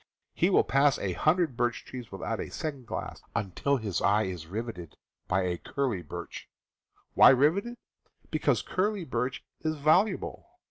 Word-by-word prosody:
He - - +2
will - - +5
pass 140 +2 +3
a 95 -2 -2
hundred 155 - +2
birch 120 0 -1
trees 125 -3 -8
without 95 - -3
a - - -4
second 140 -6 -5
glance, - - -5
until 110 +8 0
his 105 -6 -2
eye 105 +2 +3
is 90 -5 -5
riveted 100 -5 -6 0.3
by 95 +1 +1
a 90 -2 -2
curly 125 - -2
birch. 75 - -8 0.6
Why - - +8
riveted? 165 - +3 0.6
Because - - +1
curly 195 -1 -1
birch 125 0 -2 0.2
is 155 0 -1
valuable. 155 - +1
125 Hz, 150 wpm, -29 LUFS, 100-155 Hz, 0.6 s, Why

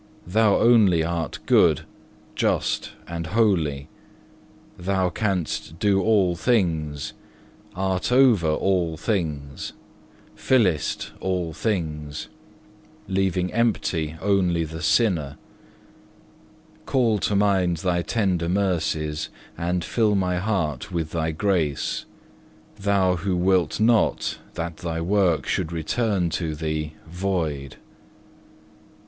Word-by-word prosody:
Thou 105 +3 +3
only 105 -8 +5
art 85 0 -2
good, - - +4 0.5
just - - 0
and 85 -1 -4
holy; 85 -9 +1 0.9
Thou 95 0 0
canst 90 -6 -2
do 100 +1 +2
all 95 -4 +3
things, 80 - 0 0.6
art 95 +3 -1
over 125 -10 +5
all 85 0 +1
things, 75 - -3 0.6
fillest 95 - +1
all 90 -3 -2
things, 80 -7 -3 0.8
leaving 95 -1 0
empty 95 -9 0
only 90 -4 +2
the 80 +1 -6
sinner. 80 - +1 1.5
Call 115 -5 +2
to 100 - 0
mind 95 -4 +2
Thy 85 +1 0
tender 90 -5 0
mercies, 80 -5 -1 0.3
and 90 +1 -1
fill 110 +3 +2
my 90 -2 +1
heart 90 - -2
with 80 -3 -2
Thy 80 -1 -1
grace, 80 -4 -1 0.7
Thou 100 -3 +2
who 90 +1 -1
wilt 90 -2 +2
not 110 0 +2 0.2
that 85 -1 -4
Thy 85 -2 -3
work 90 -2 +2
should 80 - -1
return 100 +1 0
to 80 -2 -2
Thee 75 0 -3
void. 80 -6 -2
7. - - -20
90 Hz, 105 wpm, -24 LUFS, 80-100 Hz, 1.5 s, only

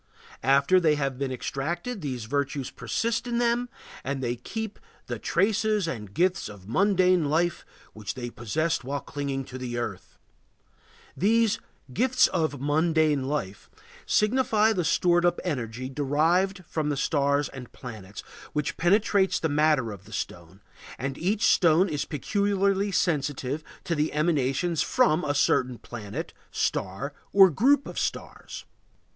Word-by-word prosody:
After 140 +8 +4
they 155 -4 +3
have 135 -3 -2
been 135 -1 -2
extracted 170 - -3
these 125 -6 -4
virtues 140 +1 -2
persist 230 +1 -2
in 240 -1 -1
them 240 +1 +1 0.3
and 140 0 -2
they 120 0 -1
keep 220 - -6 0.3
"the - - -5
traces 210 -1 +1
and 105 -10 -5
gifts 180 - +1
of 100 -2 -12
mundane 185 - +3
life 170 +3 +1 0.3
which 105 -2 -6
they 120 -2 -5
possessed 150 +7 -1
while 140 +2 -3
clinging 140 -2 -4
to 130 0 -8
the 120 -2 -4
earth." 105 -6 -5 1.0
These 225 +2 +2 0.3
"gifts 255 - +4
of 155 -5 -1
mundane 155 -1 +2
life" 130 -9 -4 0.4
signify 220 -1 +3
the 180 -4 0
stored 175 +2 +3
up 175 0 +2
energy 125 -6 -3
derived 160 +8 +1
from 155 -1 -2
the 145 - -1
stars 140 0 +1
and 125 -3 -10
planets, 105 -5 -9 0.3
which 150 -1 -2
penetrates 195 +2 +3
the 160 - 0
matter 150 -5 +2
of 100 -1 -10
the 110 - -13
stone, 90 -1 -6 0.4
and 135 +2 -3
each 200 +8 0
stone 175 +1 +5
is 150 -5 -2
peculiarly 200 - 0
sensitive 150 -4 -1 0.2
to 180 - -1
the 150 -1 0
emanations 150 +1 +1
from 205 -10 +2
a 145 -1 -1
certain 125 -3 +2
planet, 105 -5 -7 0.2
star, 125 +10 -2 0.2
or 195 -2 +7
group 270 - +3
of - - -5
stars. - - -5
150 Hz, 140 wpm, -26 LUFS, 130-190 Hz, 1.0 s, or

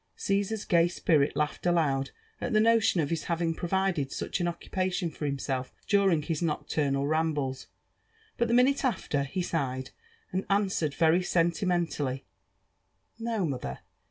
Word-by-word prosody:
Caesar 200 +2 0
s 210 - -7
gay 170 -2 +4
spirit 155 -4 +1
laughed 150 0 -1
aloud 140 -6 +2 0.3
at 245 - -2
the 215 - +5
notion 220 -5 +4
of 145 - -1
hjs 165 -2 -2
having 170 -1 0
provided 175 -4 0
iCich - - -3
an 175 - 0
occupation 180 0 -2
for 150 0 -4
himself 135 -2 -3
during 195 -6 +3
his 160 0 -2
nocturnal 145 -3 0
rambles; 150 -4 -1 0.7
but 235 - +1
the 230 - 0
minute 265 +3 +4
after, 190 - 0
he 180 +6 -3
sighed, 130 -6 -2 0.4
and 185 +1 -1
answered 195 -7 +1
very 165 +2 +4
sentimentally, 170 - 0 0.5
" - - -46
No, 225 -4 -1
mother 125 - -4
170 Hz, 150 wpm, -29 LUFS, 145-190 Hz, 0.7 s, the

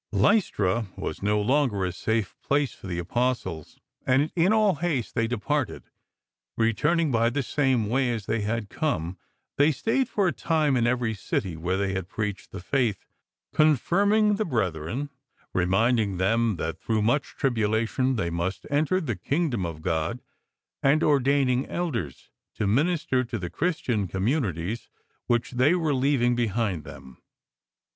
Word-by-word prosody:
Lystra 105 - +2
was - - -5
no 105 +1 +2
longer 115 -4 +1
a 90 - -1
safe 110 +2 -2
place 140 -1 +1
for - - -11
the 90 -2 -3
Apostles, 105 -4 -2 0.3
and 135 +4 +2
in 175 +3 +3
all 215 -3 +4
haste 150 -8 -1
they 115 0 +1
departed. 125 +3 -2 0.7
Returning 150 +8 +2
by 115 -1 +3
the 135 +3 -1
same 130 -4 +1
way 125 +2 +1
as 110 -4 -4
they 115 - -1
had 110 +1 -2
come, 95 - -2 0.4
they 145 +2 +5
stayed 225 - 0
for 200 -3 +1
a - - +2
time 155 -4 +1
in 120 -1 +2
every 120 -2 0
city 95 -3 -3
where 90 +4 -1
they 100 -1 -1
had 95 -1 -4
preached 105 -2 -4
the - - -6
Faith, 115 -1 0 0.5
confirming 200 - +3
the 215 - +1
brethren, 110 - -2 0.4
reminding 100 +3 +2
them 110 +3 +2
that 80 0 -4
through 110 -2 0
much 120 +7 0
tribulation 115 +1 +1
they 85 -6 -1
must 85 +3 -3
enter 155 +6 +2
the 135 - -2
Kingdom 125 - -1
of 80 -1 -8
God, 80 +10 -1 0.6
and 145 +4 +3
ordaining 135 -2 +2
Elders 125 - -4 0.2
to 110 - -1
minister 135 - +1
to 120 -2 -4
the 90 -4 -5
Christian 120 - -1
communities 95 - -2 0.4
which 120 -1 +1
they 130 +7 +3
were 160 -4 0
leav 135 -1 +2
ing 120 0 +3
behind 110 -7 -1
them. 65 -2 -12
120 Hz, 150 wpm, -26 LUFS, 100-145 Hz, 0.7 s, they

